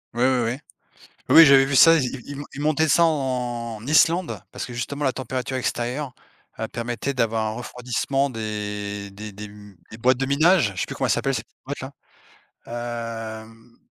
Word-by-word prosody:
Oui, 120 - +1
oui, 130 -2 +3
oui. 130 - -4 0.7
Oui 165 - +10
j'avais 135 -2 +7
vu 135 -1 0
ça, 165 +3 +8
ils 130 0 -2
ils 145 0 -6
ils 145 - -7
montaient 155 +1 +2
ça 170 - +5
en 125 -7 -2
Islande 165 +4 +3
parce - - -5
que 125 - -8
justement 135 +5 -4
la 130 - +2
température 130 0 -4
extérieure, 125 +2 -3 0.4
heu, 110 - -2
permettait 120 +4 -3
d'avoir 115 -3 0
un - - -1
refroidissement 125 +3 -2
des 105 -2 -5
des 105 +1 -8
des 105 +2 -9
m 105 -2 -13
des 110 - -10
boîtes 125 +2 +3
de 135 - -1
minage, 155 - +3
je - - -4
sais - - -1
plus - - -6
comment - - 0
elle - - +3
s'appelle - - 0
cette - - -3
petite - - -43
boîte - - -5 0.9
la, 115 -2 -5
hem, 115 +1 -19
120 Hz, 190 wpm, -23 LUFS, 110-140 Hz, 0.9 s, Oui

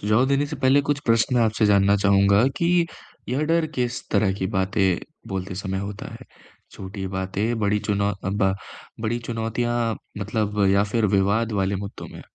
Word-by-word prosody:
सुझाव 105 +5 +3
देने 140 +1 +2
से 150 - -6
पहले 135 +1 +4
कुछ 145 -1 +1
प्रश्न 115 +3 +3
आपसे 110 0 +2
जानना 100 0 +4
चाहूँगा 100 +1 +4
कि 170 0 +2 0.4
यह 135 +5 0
डर 165 0 +2
किस 120 -1 -2
तरह 100 -2 +2
की 95 - -1
बातें 95 -1 +1 0.3
बोलते 95 0 -4
समय 95 0 -3
होता 100 0 -6
है, - - -11 0.5
छोटी 95 0 -7
बातें, 95 +5 -2
बड़ी 105 0 +2
चुनौ 100 -1 0
अ, 95 0 -6
ब 95 -1 +1 0.5
बड़ी 115 +2 -1
चुनौतियाँ 115 0 -2 0.2
मतलब, 105 0 -1
या 100 +1 +4
फिर 105 +1 0
विवाद 105 +4 +1
वाले 95 +1 0
मुद्दों 100 +1 -7
में? - - -10
105 Hz, 170 wpm, -23 LUFS, 100-120 Hz, 0.5 s, पहले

